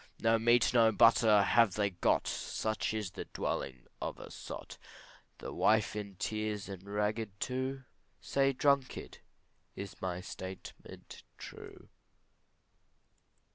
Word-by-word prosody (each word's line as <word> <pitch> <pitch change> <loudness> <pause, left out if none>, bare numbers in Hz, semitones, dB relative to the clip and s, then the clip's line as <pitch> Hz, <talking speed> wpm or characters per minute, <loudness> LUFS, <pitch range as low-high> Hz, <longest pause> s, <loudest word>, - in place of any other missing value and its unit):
No 115 0 +3
meat, 120 +1 +4
no 115 -2 +6
butter 110 -2 +6
have 115 -4 +4
they 100 -1 +1
got, 90 - +1
Such 110 0 -2
is 105 -4 -3
the - - -6
dwelling 65 -2 -4 0.2
of - - -3
a - - -10
sot, - - -8 0.6
The - - -7
wife 110 -1 +3
in 100 -2 -5
tears 105 0 -3
and 95 -2 -7
ragged 105 0 -2
too, 130 +1 -2 0.4
Say, 135 0 +2
drunkard, 140 -1 0 0.6
is 100 0 -8
my 90 -2 -2
statement 95 0 -9 0.2
true? - - -11
110 Hz, 120 wpm, -33 LUFS, 100-115 Hz, 0.6 s, no